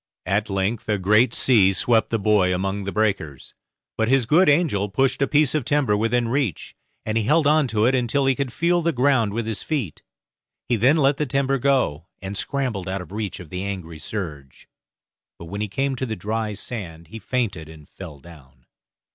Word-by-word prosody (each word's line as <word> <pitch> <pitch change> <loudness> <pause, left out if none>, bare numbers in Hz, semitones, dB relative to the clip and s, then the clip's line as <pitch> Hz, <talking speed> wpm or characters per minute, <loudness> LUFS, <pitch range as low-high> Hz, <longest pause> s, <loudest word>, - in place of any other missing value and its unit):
At 100 +3 0
length 100 +4 -2
a 105 - +2
great 105 +5 +3
sea 105 -7 +4
swept 110 +4 +2
the 115 - 0
boy 100 -3 +2
among 95 +2 -3
the 100 - -3
breakers, 100 -11 -2 0.5
but 110 - +2
his 130 -1 +3
good 160 +8 +4
angel 140 - +2
pushed 130 +6 0
a 140 - +3
piece 150 -3 +2
of 155 -3 0
timber 140 -6 +1
within 115 +3 +1
reach, 125 - -2 0.3
and 110 +1 0
he 110 - -2
held 150 +5 +3
on 150 -1 +3
to 110 -2 +1
it 125 - +3
until 130 +2 +1
he 135 - +3
could 135 -1 -3
feel 170 +6 +1
the 170 0 +1
ground 125 -4 +2
with 115 +2 -3
his 110 -2 -3
feet; 130 - -3 0.7
he 120 - +2
then 125 +8 +3
let 140 -1 +3
the 150 - -1
timber 135 +1 0
go, 120 - 0
and 95 +1 -6
scrambled 115 -6 -2
out 95 0 -3
of 90 - -11
reach 105 -3 -4
of 90 -4 -11
the 90 - -4
angry 90 -5 -6
surge; 75 - -7 0.7
but 85 - -10
when 100 +5 -6
he 105 - -1
came 135 +6 -1
to 130 +1 -3
the 110 - -3
dry 105 +2 -3
sand 85 -7 -7
he 115 - -8
fainted 100 -9 -3
and 80 -2 -14
fell 85 -6 -10
down. 70 -4 -17
110 Hz, 205 wpm, -22 LUFS, 95-135 Hz, 0.7 s, sea